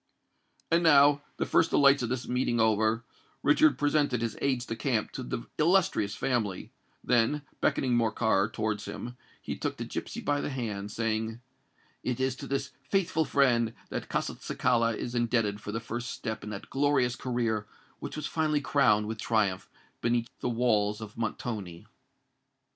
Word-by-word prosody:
And 165 Hz, +1 st, +4 dB
now, 145 Hz, -3 st, +6 dB, 0.2 s
the -, -, 0 dB
first 165 Hz, -, +3 dB
delights 140 Hz, -1 st, +5 dB
of 120 Hz, -, -2 dB
this 125 Hz, 0 st, -3 dB
meeting 125 Hz, -1 st, 0 dB
over, 110 Hz, +1 st, +2 dB, 0.4 s
Richard 145 Hz, -1 st, +5 dB
presented 145 Hz, -4 st, +1 dB
his 115 Hz, -2 st, -2 dB
aides 130 Hz, -3 st, 0 dB
de 115 Hz, -, -4 dB
camp 115 Hz, -2 st, -1 dB
to -, -, -6 dB
the 120 Hz, -1 st, -4 dB
illustrious 155 Hz, -, +2 dB
family; 110 Hz, -7 st, -1 dB, 0.3 s
then, 125 Hz, +5 st, +2 dB, 0.2 s
beckoning 125 Hz, -2 st, +2 dB
Morcar 110 Hz, -3 st, +2 dB
towards 105 Hz, -1 st, -2 dB
him, 110 Hz, +4 st, -6 dB, 0.2 s
he -, -, -5 dB
took -, -, -3 dB
the -, -, -4 dB
gipsy -, -, -5 dB
by 145 Hz, 0 st, 0 dB
the -, -, -2 dB
hand, 105 Hz, -7 st, -4 dB
saying, 110 Hz, 0 st, -2 dB, 0.6 s
"It 125 Hz, -1 st, -2 dB
is 130 Hz, -1 st, 0 dB
to -, -, -7 dB
this 140 Hz, 0 st, -2 dB, 0.2 s
faithful 170 Hz, -5 st, +1 dB
friend 120 Hz, -6 st, +2 dB
that -, -, -5 dB
Castelcicala 115 Hz, -2 st, 0 dB
is 120 Hz, -, -4 dB
indebted 115 Hz, -4 st, 0 dB
for 105 Hz, -, -5 dB
the 115 Hz, -, -2 dB
first 120 Hz, +2 st, -5 dB
step 110 Hz, -2 st, -5 dB
in 105 Hz, -, -6 dB
that 100 Hz, -2 st, -7 dB
glorious 135 Hz, -3 st, +2 dB
career 115 Hz, -5 st, -1 dB, 0.3 s
which -, -, -6 dB
was 150 Hz, -1 st, -4 dB
finally 155 Hz, -2 st, +1 dB
crowned 115 Hz, -8 st, +3 dB
with 110 Hz, 0 st, -5 dB
triumph 100 Hz, -5 st, 0 dB, 0.3 s
beneath 120 Hz, 0 st, +1 dB
the -, -, -1 dB
walls 110 Hz, -3 st, +1 dB
of 110 Hz, -2 st, -9 dB
Montoni." 105 Hz, -6 st, -4 dB
120 Hz, 160 wpm, -29 LUFS, 110-135 Hz, 0.6 s, now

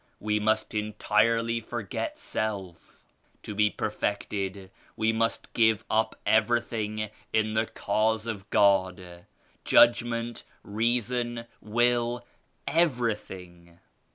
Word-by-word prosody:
We 105 Hz, 0 st, 0 dB
must 110 Hz, +1 st, 0 dB
entirely 115 Hz, +2 st, +1 dB
forget 110 Hz, -3 st, -4 dB
self. 95 Hz, -6 st, -5 dB, 0.4 s
To 105 Hz, -, -6 dB
be 105 Hz, +1 st, +3 dB
per 105 Hz, -, -3 dB
fected 100 Hz, -2 st, -3 dB, 0.2 s
we 110 Hz, 0 st, +1 dB
must 115 Hz, 0 st, -1 dB
give 110 Hz, -2 st, +3 dB
up 110 Hz, 0 st, +1 dB
everything 110 Hz, -1 st, +1 dB, 0.2 s
in 110 Hz, 0 st, +1 dB
the 110 Hz, +1 st, +1 dB
Cause 110 Hz, +2 st, 0 dB
of 105 Hz, -4 st, -5 dB
God; 95 Hz, -3 st, +1 dB, 0.4 s
judgment, 120 Hz, 0 st, +3 dB, 0.2 s
reason, 120 Hz, +2 st, -1 dB, 0.2 s
will, 120 Hz, +2 st, +1 dB, 0.4 s
everything. 105 Hz, -, -1 dB
110 Hz, 100 wpm, -27 LUFS, 100-115 Hz, 0.4 s, be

